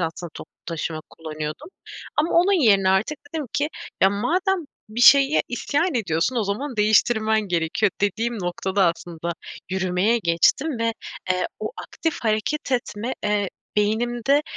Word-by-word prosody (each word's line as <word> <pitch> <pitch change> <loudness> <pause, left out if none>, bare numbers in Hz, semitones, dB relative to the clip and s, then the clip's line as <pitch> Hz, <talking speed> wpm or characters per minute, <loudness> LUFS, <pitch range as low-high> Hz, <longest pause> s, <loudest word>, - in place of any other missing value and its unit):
aslında 165 0 -4
toplu - - -10
taşıma 160 -1 -3
kullanıyordum. 155 - -6 0.5
Ama 305 +3 +2
onun 360 +2 +4
yerine 195 -4 +5
artık 215 +11 +1 0.2
dedim 310 -3 -2
ki, 295 +1 0 0.3
"Ya, 190 - +6
madem 360 - +1 0.3
bir 220 +3 -4
şeye 275 +3 +7
isyan 290 +7 -1
ediyorsun. 190 +1 0
O 225 - +1
zaman 235 +7 -3
değiştirmen 220 +1 +3
gerekiyor," 170 +4 +1
dediğim 225 +4 0
noktada 190 +1 0
aslında 170 0 -5 0.4
yürümeye 190 +4 +1
geçtim 225 - +2
ve, 230 0 0 0.4
eee, 185 0 +1
o - - -3
aktif 325 -2 -3
hareket 225 +6 -1
etme, 240 0 -2
eee, 205 -2 +1 0.3
beynimde, 240 +7 +2
215 Hz, 135 wpm, -23 LUFS, 185-265 Hz, 0.5 s, şeye